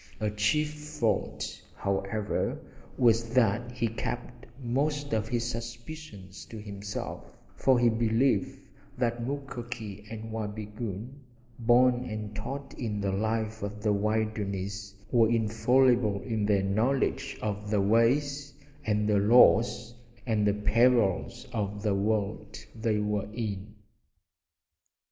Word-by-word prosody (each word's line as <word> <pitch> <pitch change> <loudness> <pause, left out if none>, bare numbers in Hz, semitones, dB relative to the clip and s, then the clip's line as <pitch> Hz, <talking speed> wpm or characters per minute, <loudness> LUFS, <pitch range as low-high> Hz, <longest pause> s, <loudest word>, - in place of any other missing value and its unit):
A 105 -1 0
chief 150 +9 +1 0.3
fault, 110 -4 -1
however, 100 +2 -1 0.4
was 115 -1 +3
that 120 0 +3
he 120 -1 -1
kept 120 +2 -5 0.2
most 145 +3 0
of 110 0 0
his 120 0 -1
suspicions 115 - -7
to 110 - -9
himself, 100 -1 -6 0.2
for 130 -2 +3
he 120 0 +4
believed 115 -1 +2 0.4
that 120 -1 0
Mukoki 120 -6 -5
and 110 0 -7
Wabigoon, 110 +3 -5 0.4
born 125 +1 +4
and 110 -2 -5
taught 135 +6 -5
in 110 -4 -2
the 100 -1 0
life 110 +2 -1
of 105 +1 -5
the 105 -2 +3
wilderness, 100 -2 -2 0.2
were 115 -2 +5
infallible 115 0 +3
in 110 -4 -1
their 100 -2 +3
knowledge 110 +8 0
of 105 0 -3
the 105 -1 +2
ways 140 +7 +2 0.3
and 105 -3 +1
the 105 -1 +3
laws 120 +2 +5 0.3
and 110 -4 +2
the 100 - +3
perils 105 -1 +2
of 105 -1 -2
the 105 -2 +2
world 105 +1 -1 0.2
they 110 -1 0
were 105 -1 -1
in. 105 -2 -4
110 Hz, 120 wpm, -29 LUFS, 105-120 Hz, 0.4 s, were